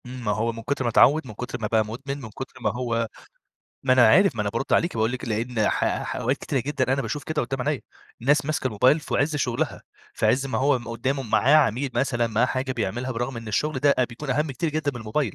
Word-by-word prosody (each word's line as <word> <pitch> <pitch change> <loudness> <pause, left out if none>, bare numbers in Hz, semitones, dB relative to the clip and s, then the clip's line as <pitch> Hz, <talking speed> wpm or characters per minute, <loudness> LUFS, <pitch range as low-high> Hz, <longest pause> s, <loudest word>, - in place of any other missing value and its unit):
إمم، 125 -1 -8
ما 105 - +1
هو 110 +3 0
من 115 0 -9
كُتر 140 +2 -1
ما 120 - +1
اتعوّد 145 +7 +5
من 110 - -8
كُتر 125 +4 -5
ما 105 - 0
بقى 110 0 +2
مدمن، 135 +6 -6
من 115 - -8
كُتر 125 +3 -9
ما 110 - +1
هو 115 -2 -1 0.8
ما 130 - +3
أنا 125 -3 +6
عارف 185 - +5
ما 105 - 0
أنا 105 - -2
بارُدّ 115 +5 -3
عليكِ، 170 - +2
واقول 110 +2 +1
لِك 130 - -4
لإن 115 0 0
ح - - 0
ح - - -4
أوقات 130 +4 0
كتيرة 135 -1 -2
جدًا 130 0 -1
أنا 135 +1 0
باشوف 145 +1 -4
كده 155 -1 -1
قدّام 130 +1 -3
عينيا، 150 -4 0 0.4
الناس 145 +3 +3
ماسكة 155 -3 -1
الموبايل 130 +6 +3
فعِزّ 150 0 0
شغلها 125 -4 -2 0.3
فعِزّ 135 +2 +2
ما 120 -4 -2
هو 140 0 +3
م 120 -1 -10
قدّامه 130 +4 -2
معاه 115 +5 +3
عميل 135 -1 +2
مثلًا 120 -4 +1
معاه 115 +2 +2
حاجة 130 +1 -2
بيعملها 120 +2 -3
برغم 120 +2 -3
إن 115 -1 -7
الشغل 145 +7 0
ده 140 +1 +4
أ 130 - +4
بيكون 130 +4 -7
أهَم 150 +3 0
كتير 160 +4 -2
جدًا 155 -1 -1
من 120 - -6
الموبايل، 110 +1 -2
125 Hz, 245 wpm, -24 LUFS, 115-140 Hz, 0.8 s, أنا